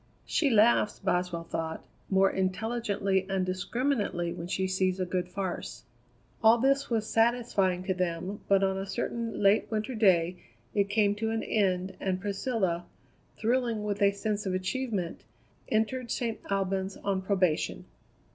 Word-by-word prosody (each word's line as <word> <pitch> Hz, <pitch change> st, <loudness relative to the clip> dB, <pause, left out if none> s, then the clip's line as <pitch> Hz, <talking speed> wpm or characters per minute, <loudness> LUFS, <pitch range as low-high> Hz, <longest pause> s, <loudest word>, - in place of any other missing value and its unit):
"She 295 Hz, -, +2 dB
laughs," 220 Hz, -1 st, +4 dB
Boswell 180 Hz, -3 st, -1 dB
thought, 165 Hz, -1 st, -4 dB, 0.2 s
"more 195 Hz, 0 st, +4 dB
intelligently 195 Hz, -1 st, 0 dB
and 190 Hz, -1 st, 0 dB
discriminately 185 Hz, -1 st, -1 dB
when 170 Hz, -, -6 dB
she 190 Hz, +1 st, -1 dB
sees 185 Hz, 0 st, 0 dB
a 185 Hz, -, 0 dB
good 180 Hz, 0 st, -2 dB
farce." 185 Hz, -1 st, -4 dB, 0.6 s
All 225 Hz, +1 st, +7 dB
this 275 Hz, +3 st, +2 dB
was 220 Hz, -2 st, 0 dB
satisfying 225 Hz, -6 st, +2 dB
to 190 Hz, 0 st, 0 dB
them, 180 Hz, +2 st, -2 dB
but 195 Hz, 0 st, +4 dB
on 190 Hz, 0 st, +1 dB
a 195 Hz, -, -4 dB
certain 230 Hz, 0 st, -3 dB
late 200 Hz, +2 st, +4 dB
winter 220 Hz, +3 st, -2 dB
day 180 Hz, -5 st, +3 dB, 0.4 s
it 200 Hz, -1 st, +1 dB
came 205 Hz, -1 st, +3 dB
to 220 Hz, +1 st, -1 dB
an 225 Hz, 0 st, -1 dB
end, 190 Hz, -3 st, 0 dB
and 185 Hz, -1 st, -1 dB
Priscilla, 195 Hz, -3 st, -1 dB, 0.5 s
thrilling 235 Hz, -2 st, 0 dB
with 205 Hz, 0 st, -2 dB
a 200 Hz, 0 st, +5 dB
sense 205 Hz, 0 st, -2 dB
of 185 Hz, -, 0 dB
achievement, 190 Hz, -2 st, -2 dB, 0.5 s
entered 230 Hz, +3 st, 0 dB
St. 230 Hz, -2 st, -2 dB
Albans 195 Hz, -1 st, -1 dB
on 195 Hz, -1 st, -1 dB
probation. 185 Hz, -4 st, 0 dB
195 Hz, 145 wpm, -29 LUFS, 185-225 Hz, 0.6 s, All